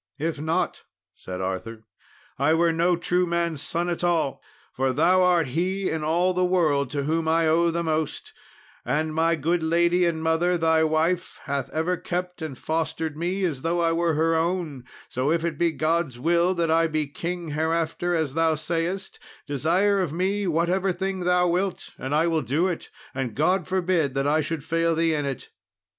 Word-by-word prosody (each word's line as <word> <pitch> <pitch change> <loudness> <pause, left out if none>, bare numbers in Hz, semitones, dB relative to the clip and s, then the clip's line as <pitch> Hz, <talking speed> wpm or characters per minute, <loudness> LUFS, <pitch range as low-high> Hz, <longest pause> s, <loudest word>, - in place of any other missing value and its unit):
"If 160 -1 -3
not," 160 +1 -1 0.3
said 90 0 -7
Arthur, 100 +4 -4 0.6
"I 155 +3 +3
were 165 0 +3
no 170 +2 +2
true 180 +1 0
man's 170 -3 -1
son 170 +2 -2
at 175 0 -2
all, 165 -6 0 0.3
for 130 0 0
thou 175 +7 +4
art 175 -5 +3
he 185 +7 -1
in 160 -1 -2
all 175 +4 +2
the 180 0 +1
world 155 -7 +2
to 140 0 -2
whom 160 +2 0
I 165 +1 +3
owe 170 +2 +3
the 170 +1 -1
most; 155 -2 -2 0.5
and 155 +1 -1
my 165 +1 +2
good 165 +3 0
lady 170 +2 +2
and 160 -1 -2
mother, 165 +2 +2
thy 160 -1 +3
wife, 165 +3 0
hath 140 -2 -3
ever 165 +5 -1
kept 180 0 -4
and 155 -5 -5
fostered 160 0 -2
me 180 +5 -2
as 155 -8 -1
though 170 +3 0
I 165 -1 +2
were 165 -1 +1
her 165 +2 +2
own; 165 -5 -1 0.2
so 130 +3 -1
if 165 0 +1
it 160 -3 -3
be 170 -1 +3
God's 160 -4 0
will 170 +6 +2
that 165 -2 0
I 165 +1 +4
be 155 -1 -1
king 170 +3 -5
hereafter 165 +3 -1
as 160 -5 -1
thou 165 0 +2
sayest, 170 +5 -3 0.3
desire 180 +8 +2
of 175 -6 -2
me 190 +4 -1
whatever 175 +3 +1
thing 190 +1 -3
thou 180 0 +3
wilt 180 +2 -1
and 135 +3 -2
I 160 +2 +3
will 165 -2 +1
do 150 +9 +1
it; 175 -3 -4 0.2
and 130 -4 -3
God 175 +4 +1
forbid 180 -7 0
that 135 0 0
I 155 +2 +3
should 155 -1 -4
fail 165 +1 +1
thee 165 0 +2
in 145 -2 -1
it." 135 -3 -5
165 Hz, 190 wpm, -25 LUFS, 155-175 Hz, 0.6 s, thou